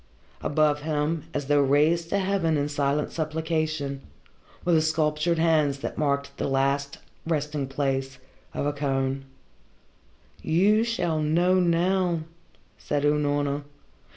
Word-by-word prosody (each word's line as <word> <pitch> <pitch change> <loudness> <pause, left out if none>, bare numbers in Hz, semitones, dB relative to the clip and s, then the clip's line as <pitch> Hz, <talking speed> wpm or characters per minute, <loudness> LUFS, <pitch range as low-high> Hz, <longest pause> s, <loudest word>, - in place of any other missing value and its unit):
Above 150 0 +2
him, 155 +1 -1
as 145 -3 -3
though 145 +1 +3
raised 155 +5 +2
to 200 - +1
heaven 190 -5 +1
in 145 0 0
silent 145 0 0
supplication, 155 -3 -2 0.6
were 175 - +3
the 160 - +5
sculptured 155 +1 +1
hands 155 -4 +2
that - - -5
marked 140 -2 -1
the - - -1
last 140 +1 0 0.3
resting 150 -3 -1
place 135 -1 -2 0.4
of - - -1
a 145 - 0
Kohn. 135 -1 -1 1.2
"You 200 +7 +3
shall 175 -9 -1
know 175 +5 +3
now," 175 0 +2 0.6
said 145 -1 -2
Unorna. 145 -1 +1
150 Hz, 125 wpm, -26 LUFS, 140-165 Hz, 1.2 s, the